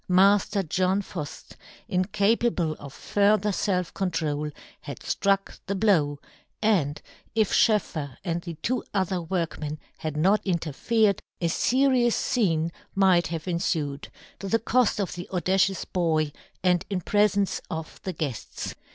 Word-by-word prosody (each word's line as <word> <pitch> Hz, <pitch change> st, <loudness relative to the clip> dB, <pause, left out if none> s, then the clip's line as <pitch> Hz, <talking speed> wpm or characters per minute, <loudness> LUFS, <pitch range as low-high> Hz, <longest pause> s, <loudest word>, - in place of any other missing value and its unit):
Mafter 195 Hz, 0 st, +4 dB
John 185 Hz, +4 st, +1 dB
Fuft, 155 Hz, -7 st, -7 dB, 0.4 s
incapable 200 Hz, -3 st, +1 dB
of 140 Hz, -, -9 dB
fur 205 Hz, +8 st, +2 dB
ther 210 Hz, +1 st, -1 dB
felf 185 Hz, -3 st, 0 dB
control, 155 Hz, -5 st, -1 dB, 0.3 s
had 140 Hz, -4 st, -8 dB
ftruck 195 Hz, 0 st, 0 dB
the 200 Hz, -, -1 dB
blow; 170 Hz, -9 st, +3 dB, 0.4 s
and, 175 Hz, -10 st, +2 dB, 0.4 s
if 220 Hz, -3 st, +2 dB
SchoefFer 160 Hz, -, +2 dB
and 170 Hz, -2 st, -1 dB
the 170 Hz, -1 st, -7 dB
two 255 Hz, +2 st, 0 dB
other 185 Hz, -2 st, 0 dB
workmen 165 Hz, -3 st, -3 dB, 0.2 s
had 155 Hz, -1 st, -4 dB
not 195 Hz, +7 st, +3 dB
interfered, 195 Hz, +5 st, +1 dB, 0.2 s
a 170 Hz, -, 0 dB
ferious 255 Hz, +4 st, +3 dB
fcene 170 Hz, -9 st, +1 dB, 0.2 s
might 190 Hz, -3 st, +4 dB
have 165 Hz, -2 st, -4 dB
enfued, 160 Hz, -5 st, -1 dB, 0.3 s
to 195 Hz, -, -5 dB
the 225 Hz, -, +3 dB
coft 230 Hz, 0 st, +2 dB
of 195 Hz, -, -1 dB
the 175 Hz, 0 st, -7 dB
audacious 190 Hz, +1 st, +1 dB
boy, 160 Hz, -4 st, +1 dB, 0.3 s
and 180 Hz, -2 st, +3 dB
in 190 Hz, -3 st, -1 dB
prefence 205 Hz, +1 st, +2 dB
of 160 Hz, -1 st, -6 dB
the 190 Hz, -, -3 dB
guefts. 145 Hz, -7 st, -4 dB
185 Hz, 135 wpm, -26 LUFS, 160-205 Hz, 0.4 s, Mafter